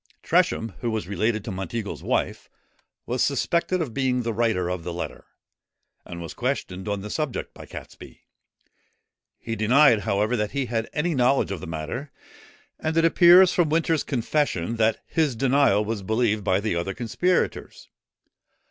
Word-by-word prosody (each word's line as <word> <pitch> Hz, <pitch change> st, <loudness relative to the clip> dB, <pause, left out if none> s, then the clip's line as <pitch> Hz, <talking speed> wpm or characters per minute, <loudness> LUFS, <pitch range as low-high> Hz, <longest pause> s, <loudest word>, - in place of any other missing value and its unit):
Tresham, 115 Hz, -, +2 dB
who 120 Hz, -, -2 dB
was 110 Hz, -5 st, -3 dB
related 110 Hz, +2 st, -1 dB
to 110 Hz, -, -4 dB
Monteagle's 95 Hz, +3 st, -5 dB
wife, -, -, -2 dB, 0.6 s
was 125 Hz, +1 st, -2 dB
suspected 170 Hz, +5 st, +1 dB
of 125 Hz, -7 st, -7 dB
being 125 Hz, -1 st, 0 dB
the 115 Hz, -1 st, -2 dB
writer 110 Hz, -6 st, 0 dB
of 90 Hz, -1 st, -3 dB
the 90 Hz, -, -4 dB
letter, 85 Hz, -, -6 dB, 0.8 s
and 85 Hz, -, -7 dB
was 85 Hz, -1 st, -7 dB
questioned 110 Hz, -7 st, -3 dB
on 100 Hz, -1 st, -2 dB
the 105 Hz, -, -7 dB
subject 150 Hz, -5 st, -3 dB
by -, -, -12 dB
Catesby. -, -, -11 dB, 1.1 s
He 115 Hz, -, -5 dB
denied, 120 Hz, +2 st, +5 dB
however, 105 Hz, +4 st, 0 dB
that 105 Hz, -2 st, -2 dB
he 140 Hz, -2 st, -1 dB
had 115 Hz, -1 st, -2 dB
any 160 Hz, +3 st, -1 dB
knowledge 130 Hz, -3 st, +2 dB
of 95 Hz, -, -3 dB
the -, -, -7 dB
matter; 80 Hz, -, -5 dB, 0.7 s
and 160 Hz, +1 st, -2 dB
it 165 Hz, -, +4 dB
appears 175 Hz, +2 st, +7 dB
from 170 Hz, -4 st, +2 dB
Winter's 160 Hz, -1 st, +1 dB
confession 115 Hz, -, -1 dB
that 110 Hz, 0 st, +1 dB
his 155 Hz, -6 st, 0 dB
denial 130 Hz, -4 st, +3 dB
was 110 Hz, -1 st, -3 dB
believed 110 Hz, +1 st, 0 dB
by 95 Hz, -1 st, +2 dB
the 105 Hz, -3 st, -1 dB
other 85 Hz, +3 st, -3 dB
conspirators. 175 Hz, +10 st, -1 dB
115 Hz, 160 wpm, -24 LUFS, 100-140 Hz, 1.1 s, appears